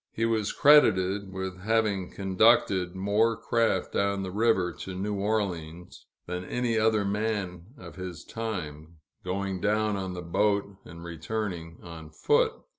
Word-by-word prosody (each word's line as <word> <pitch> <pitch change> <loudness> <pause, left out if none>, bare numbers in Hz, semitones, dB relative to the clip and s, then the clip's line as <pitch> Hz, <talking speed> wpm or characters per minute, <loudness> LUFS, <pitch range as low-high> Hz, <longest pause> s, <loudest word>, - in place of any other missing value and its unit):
He 115 - -1
was 110 -2 0
credited 100 -9 +4
with 95 -1 -5
having 105 -2 0
conducted 95 -2 +2
more 105 +4 +1
craft 115 -5 0
down 100 -1 0
the 95 - -5
river 100 -4 +2
to 95 - -6
New 100 +3 -2
Orleans, 90 -5 -3 0.2
than 90 +1 -4
any 120 +3 -1
other 110 -2 +2
man 100 -4 -2
of 90 -4 -12
his 90 -3 -7
time 85 -9 -6 0.3
going 95 +1 -3
down 105 +1 +1
on 95 -2 -4
the 90 - -6
boat, 100 +3 0
and 85 0 -11
returning 85 -1 -5
on 80 -2 -10
foot. 75 - +2
95 Hz, 140 wpm, -27 LUFS, 90-110 Hz, 0.3 s, credited